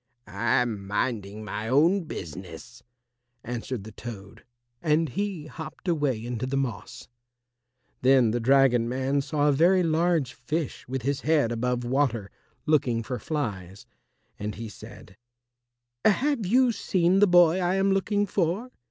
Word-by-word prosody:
"I 120 Hz, +1 st, +1 dB
am 105 Hz, -5 st, -5 dB
minding 105 Hz, 0 st, -2 dB
my 110 Hz, +1 st, -4 dB
own 165 Hz, -, +3 dB
business," 95 Hz, -, -8 dB, 0.6 s
answered 120 Hz, -1 st, -5 dB
the 110 Hz, -, -10 dB
Toad, 105 Hz, -3 st, -10 dB, 0.4 s
and 155 Hz, 0 st, +2 dB
he 195 Hz, -1 st, -3 dB
hopped 160 Hz, +3 st, -9 dB
away 145 Hz, -9 st, 0 dB
into 120 Hz, +1 st, -3 dB
the 135 Hz, +1 st, -1 dB
moss. 125 Hz, -6 st, -4 dB, 0.9 s
Then 130 Hz, -3 st, +4 dB
the 120 Hz, -, 0 dB
dragon 125 Hz, -1 st, +3 dB
man 135 Hz, +2 st, 0 dB
saw 145 Hz, +1 st, 0 dB
a -, -, +5 dB
very 175 Hz, +6 st, +4 dB
large 165 Hz, -4 st, +1 dB
fish 150 Hz, +5 st, -4 dB
with 130 Hz, -1 st, -4 dB
his 140 Hz, +1 st, -1 dB
head 150 Hz, -7 st, +2 dB
above 125 Hz, +1 st, -1 dB
water, 120 Hz, -5 st, 0 dB, 0.3 s
looking 125 Hz, -7 st, +1 dB
for 125 Hz, +2 st, -4 dB
flies, 100 Hz, -, -4 dB, 0.5 s
and 105 Hz, 0 st, -4 dB
he 115 Hz, +1 st, -7 dB
said, 95 Hz, -2 st, -13 dB, 0.9 s
"Have 245 Hz, 0 st, +2 dB
you 250 Hz, +4 st, +4 dB
seen 185 Hz, -3 st, +1 dB
the 205 Hz, -, +6 dB
boy 175 Hz, -1 st, +5 dB
I 180 Hz, 0 st, +1 dB
am 195 Hz, 0 st, +2 dB
looking 205 Hz, +1 st, +1 dB
for?" 195 Hz, +6 st, -1 dB
135 Hz, 145 wpm, -26 LUFS, 115-170 Hz, 0.9 s, the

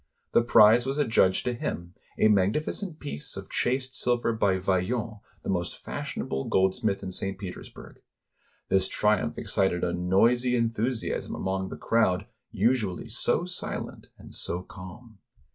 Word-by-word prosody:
The -, -, +5 dB
prize 115 Hz, 0 st, +6 dB
was 135 Hz, +2 st, -1 dB
adjudged 110 Hz, -9 st, +3 dB
to 125 Hz, -, 0 dB
him, 85 Hz, -7 st, -4 dB, 0.2 s
a -, -, +5 dB
magnificent 150 Hz, -, +1 dB
piece 110 Hz, -, -6 dB
of -, -, -8 dB
chased 130 Hz, +1 st, 0 dB
silver 120 Hz, -1 st, +1 dB
by 100 Hz, -4 st, +2 dB
Vaillant, 100 Hz, +4 st, -1 dB, 0.2 s
the -, -, -5 dB
most 90 Hz, -2 st, -2 dB
fashionable 65 Hz, 0 st, -4 dB
gold 95 Hz, 0 st, +3 dB
smith 110 Hz, -5 st, -1 dB
in 95 Hz, -, -4 dB
St. 95 Hz, +1 st, -3 dB
Petersburg. 95 Hz, -3 st, -9 dB, 0.7 s
This 95 Hz, -1 st, +2 dB
triumph 105 Hz, -8 st, +1 dB
excited 95 Hz, -3 st, 0 dB
a 85 Hz, -, 0 dB
noisy 115 Hz, +8 st, +3 dB
enthusiasm 115 Hz, +1 st, -1 dB
among 95 Hz, 0 st, -2 dB
the -, -, -7 dB
crowd 105 Hz, -4 st, +2 dB, 0.2 s
usually 105 Hz, -3 st, 0 dB
so 170 Hz, -, 0 dB
silent 180 Hz, 0 st, -5 dB
and -, -, -13 dB
so 90 Hz, +1 st, -3 dB
calm. 100 Hz, +5 st, -12 dB
105 Hz, 145 wpm, -27 LUFS, 95-120 Hz, 0.7 s, prize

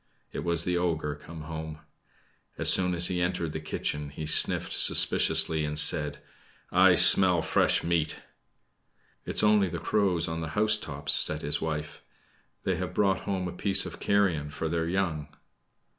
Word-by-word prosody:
It -, -, -6 dB
was 85 Hz, -1 st, 0 dB
the 90 Hz, 0 st, -2 dB
ogre 80 Hz, -4 st, -3 dB
come 80 Hz, +2 st, -12 dB
home. 80 Hz, 0 st, -8 dB, 0.8 s
As -, -, +4 dB
soon 90 Hz, -1 st, -1 dB
as 85 Hz, +1 st, +3 dB
he 90 Hz, -1 st, -1 dB
entered 90 Hz, -2 st, -3 dB
the 80 Hz, -, -6 dB
kitchen, 75 Hz, -1 st, -5 dB
he 75 Hz, +2 st, -8 dB
sniffed 80 Hz, -, +2 dB
suspiciously, 80 Hz, -1 st, +3 dB
and 75 Hz, 0 st, -4 dB
said: 75 Hz, -1 st, +1 dB, 0.5 s
"I -, -, +4 dB
smell 90 Hz, -4 st, +6 dB
fresh -, -, +1 dB
meat!" 85 Hz, -2 st, -2 dB, 1.1 s
"It -, -, -7 dB
is -, -, +3 dB
only 105 Hz, -2 st, +3 dB
the 85 Hz, -, -6 dB
crows 90 Hz, -2 st, -1 dB
on 80 Hz, 0 st, -5 dB
the 80 Hz, +4 st, -7 dB
housetops," 105 Hz, -10 st, 0 dB
said -, -, +3 dB
his 75 Hz, -, -2 dB
wife. 75 Hz, -1 st, -6 dB, 0.6 s
"They -, -, -2 dB
have -, -, -6 dB
brought 95 Hz, -2 st, 0 dB
home 95 Hz, -2 st, -3 dB
a -, -, -6 dB
piece 95 Hz, +2 st, +1 dB
of -, -, -10 dB
carrion 95 Hz, -8 st, -1 dB
for 80 Hz, +2 st, -6 dB
their 80 Hz, 0 st, -3 dB
young." 85 Hz, -5 st, -3 dB
80 Hz, 165 wpm, -26 LUFS, 75-90 Hz, 1.1 s, smell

